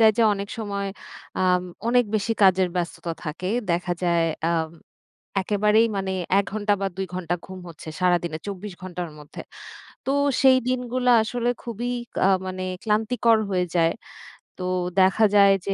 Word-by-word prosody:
যায় 220 Hz, -1 st, +8 dB
যে, -, -, +5 dB
অনেক 200 Hz, 0 st, -5 dB
সময় 200 Hz, -2 st, -3 dB, 0.6 s
আম 180 Hz, -1 st, +3 dB, 0.3 s
অনেক 245 Hz, 0 st, +4 dB
বেশি 215 Hz, +2 st, +1 dB
কাজের 185 Hz, -1 st, +5 dB
ব্যস্ততা 170 Hz, -1 st, -3 dB
থাকে। 160 Hz, +4 st, -4 dB, 0.2 s
দেখা 175 Hz, +1 st, 0 dB
যায় 170 Hz, -1 st, +2 dB, 0.3 s
আম 160 Hz, -1 st, 0 dB, 0.7 s
একেবারেই 210 Hz, +3 st, +3 dB
মানে 190 Hz, -1 st, -2 dB, 0.3 s
১ 200 Hz, -, +2 dB
ঘন্টা 205 Hz, -1 st, +1 dB
বা 195 Hz, -, 0 dB
২ 190 Hz, 0 st, -2 dB
ঘন্টা 175 Hz, -1 st, -2 dB
ঘুম 190 Hz, 0 st, -9 dB
হচ্ছে 165 Hz, -1 st, -11 dB
সারাদিনে, 175 Hz, -3 st, +1 dB
২৪ 200 Hz, 0 st, -6 dB
ঘণ্টার 180 Hz, -2 st, -5 dB
মধ্যে। 150 Hz, 0 st, -10 dB, 0.6 s
তো, -, -, 0 dB, 0.3 s
সেই 260 Hz, -1 st, +7 dB
দিনগুলা 250 Hz, 0 st, +1 dB
আসলে 240 Hz, +2 st, -1 dB
খুবই 240 Hz, +1 st, -4 dB, 0.3 s
কা -, -, +3 dB, 0.2 s
মানে 185 Hz, 0 st, -4 dB, 0.2 s
ক্লান্তিকর 225 Hz, +1 st, +2 dB
হয়ে 180 Hz, -2 st, +1 dB
যায়। 165 Hz, -1 st, +3 dB, 0.7 s
তো, 185 Hz, -, -6 dB, 0.4 s
দেখা 190 Hz, +4 st, +4 dB
যায় 200 Hz, -1 st, +7 dB
যে, 195 Hz, -, 0 dB
195 Hz, 155 wpm, -24 LUFS, 180-220 Hz, 0.7 s, যায়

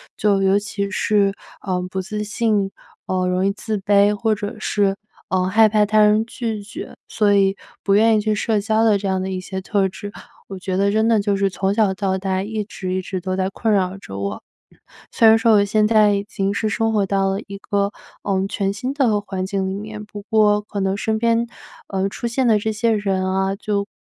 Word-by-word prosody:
就 200 Hz, -2 st, +2 dB
尤 195 Hz, +1 st, +4 dB
其 200 Hz, -1 st, -3 dB
是， 200 Hz, 0 st, +1 dB, 0.3 s
呃， 185 Hz, -2 st, -2 dB
不 190 Hz, -, -2 dB
自 210 Hz, +2 st, -4 dB
信， 210 Hz, -2 st, 0 dB, 0.4 s
呃， 185 Hz, -1 st, 0 dB
容 180 Hz, +1 st, +1 dB
易 195 Hz, -, +2 dB
自 215 Hz, +1 st, -4 dB
卑 200 Hz, +1 st, +3 dB
或 220 Hz, +1 st, +1 dB
者 205 Hz, +1 st, -5 dB
是， 200 Hz, -2 st, 0 dB, 0.3 s
呃， 185 Hz, 0 st, +1 dB
害 220 Hz, +3 st, +5 dB
怕 210 Hz, 0 st, +3 dB
他 215 Hz, +1 st, +2 dB
人 210 Hz, +1 st, +4 dB
拒 225 Hz, -3 st, -4 dB
绝， 205 Hz, -, -9 dB
所 205 Hz, -1 st, +2 dB
以 195 Hz, -1 st, +3 dB, 0.3 s
不 195 Hz, -, +2 dB
愿 220 Hz, +2 st, +5 dB
意 215 Hz, -, +2 dB
去 215 Hz, 0 st, 0 dB
社 210 Hz, 0 st, 0 dB
交 220 Hz, +2 st, +2 dB
的 215 Hz, -2 st, +4 dB
这 200 Hz, -, -7 dB
样 190 Hz, -1 st, 0 dB
的 190 Hz, -, -3 dB
一 185 Hz, -1 st, -3 dB
些 190 Hz, 0 st, -5 dB
特 195 Hz, 0 st, 0 dB
质， 205 Hz, +2 st, -8 dB, 0.3 s
我 195 Hz, -, -7 dB
觉 185 Hz, 0 st, -3 dB
得 200 Hz, +1 st, +2 dB
真 220 Hz, +2 st, +2 dB
的 225 Hz, -, +4 dB
就 200 Hz, 0 st, 0 dB
是 195 Hz, 0 st, +1 dB
从 195 Hz, +1 st, -1 dB
小 210 Hz, -3 st, +2 dB
到 190 Hz, -1 st, -1 dB
大 190 Hz, 0 st, -1 dB
一 215 Hz, +1 st, -3 dB
直 185 Hz, -3 st, -5 dB
一 185 Hz, -, -1 dB
直 185 Hz, 0 st, -4 dB
都 185 Hz, +1 st, -3 dB
在 190 Hz, 0 st, 0 dB
困 220 Hz, +2 st, -1 dB
扰 190 Hz, -1 st, 0 dB
着 100 Hz, -, -9 dB
我。 100 Hz, 0 st, -4 dB, 0.7 s
虽 225 Hz, -, +4 dB
然 220 Hz, -, +8 dB
说 225 Hz, 0 st, +3 dB
我 205 Hz, -1 st, +5 dB
现 210 Hz, +1 st, +2 dB
在 215 Hz, -2 st, +4 dB
已 200 Hz, 0 st, -1 dB
经 195 Hz, -1 st, -2 dB
是 215 Hz, +2 st, -1 dB
生 225 Hz, +1 st, 0 dB
活 205 Hz, -2 st, +2 dB
到 195 Hz, 0 st, +1 dB
了 195 Hz, +1 st, -1 dB
一 200 Hz, -1 st, -7 dB
个， 200 Hz, 0 st, -1 dB, 0.3 s
呃， 195 Hz, -1 st, 0 dB
全 195 Hz, -1 st, -1 dB
新 250 Hz, +7 st, -4 dB
的 245 Hz, -7 st, +2 dB
环 190 Hz, -2 st, -5 dB
境 190 Hz, 0 st, -2 dB
里 190 Hz, -, -3 dB
面， 210 Hz, +1 st, -7 dB
不 210 Hz, -1 st, -9 dB
过 210 Hz, -2 st, +4 dB
可 210 Hz, -1 st, -6 dB
能 195 Hz, 0 st, 0 dB
身 220 Hz, +1 st, -1 dB
边， 230 Hz, +1 st, +1 dB, 0.4 s
呃， 195 Hz, 0 st, -1 dB
出 235 Hz, +4 st, -4 dB
现 250 Hz, +2 st, 0 dB
的 215 Hz, -2 st, +4 dB
这 220 Hz, +1 st, -1 dB
些 225 Hz, +2 st, +1 dB
人 195 Hz, -3 st, 0 dB
啊， 190 Hz, +1 st, 0 dB
就 200 Hz, 0 st, -2 dB
200 Hz, 245 characters per minute, -21 LUFS, 195-215 Hz, 0.7 s, 然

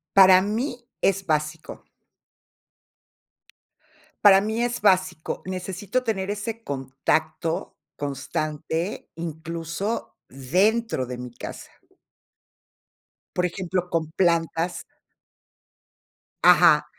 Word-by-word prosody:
Para 190 Hz, -1 st, +8 dB
mí 240 Hz, +4 st, -3 dB
es 195 Hz, 0 st, +1 dB
básico. 155 Hz, 0 st, -2 dB, 2.4 s
Para 195 Hz, -2 st, +8 dB
mí 220 Hz, +3 st, -1 dB
es 240 Hz, 0 st, -2 dB
básico, 185 Hz, -5 st, +1 dB
necesito 190 Hz, +6 st, -3 dB
tener 200 Hz, -4 st, -1 dB
ese 225 Hz, +2 st, -5 dB
contacto 145 Hz, -, -2 dB, 0.2 s
constante, 155 Hz, +5 st, -3 dB
incluso 165 Hz, +5 st, -4 dB
dentro 185 Hz, -, +1 dB
de 125 Hz, 0 st, -6 dB
mi 125 Hz, 0 st, -7 dB
casa. -, -, -8 dB, 1.6 s
Por 180 Hz, -, +1 dB
ejemplo, 180 Hz, 0 st, -2 dB
con 160 Hz, -2 st, -1 dB
plantas. 170 Hz, 0 st, 0 dB, 1.6 s
Ajá. -, -, +7 dB
180 Hz, 80 wpm, -24 LUFS, 160-205 Hz, 2.4 s, Para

